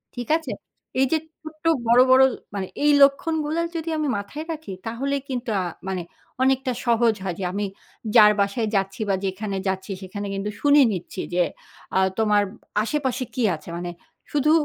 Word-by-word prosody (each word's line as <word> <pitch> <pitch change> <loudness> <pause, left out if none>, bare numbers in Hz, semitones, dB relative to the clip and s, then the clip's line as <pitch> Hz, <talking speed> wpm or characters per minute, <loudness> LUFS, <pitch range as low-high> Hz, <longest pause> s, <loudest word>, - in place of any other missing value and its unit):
ঠিক 245 -1 -5
আছে? 315 -7 -7 0.5
এইযে 270 +4 +3 0.2
ছোট্ট 310 -1 -11 0.2
বড়, 240 +2 +7
বড় 260 +1 +8 0.3
মানে 190 -2 -2 0.2
এই 295 - +6
লক্ষণগুলো 305 +3 +3 0.2
যদি 330 0 -3
আমি 305 -1 0
মাথায় 205 +11 -6
রাখি, 315 -9 -6
তাহলে 260 +5 -2
কিন্তু 250 -2 -3
আ - - -1 0.2
মানে 190 -2 -2 0.4
অনেকটা 265 0 +2
সহজ 235 -1 +4
হয় 185 -3 -2
যে, - - -3
আমি 205 +1 -1 0.5
যার 210 -2 +9
বাসায় 200 +3 +1
যাচ্ছি 195 +1 -1
বা 195 - +3
যেখানে 195 +1 -3
যাচ্ছি 190 +1 -2
সেখানে 200 +2 -5
কিন্তু 195 +1 -2
শুনে 290 0 +6
নিচ্ছি 185 +1 -5
যে, 180 0 +4 0.5
আ - - +4 0.2
তোমার 210 -2 +3 0.4
আশেপাশে 260 0 -1
কি 250 - 0
আছে? 155 - -12
মানে 175 0 -4 0.4
শুধু 295 +1 +3
235 Hz, 165 wpm, -24 LUFS, 195-280 Hz, 0.5 s, যার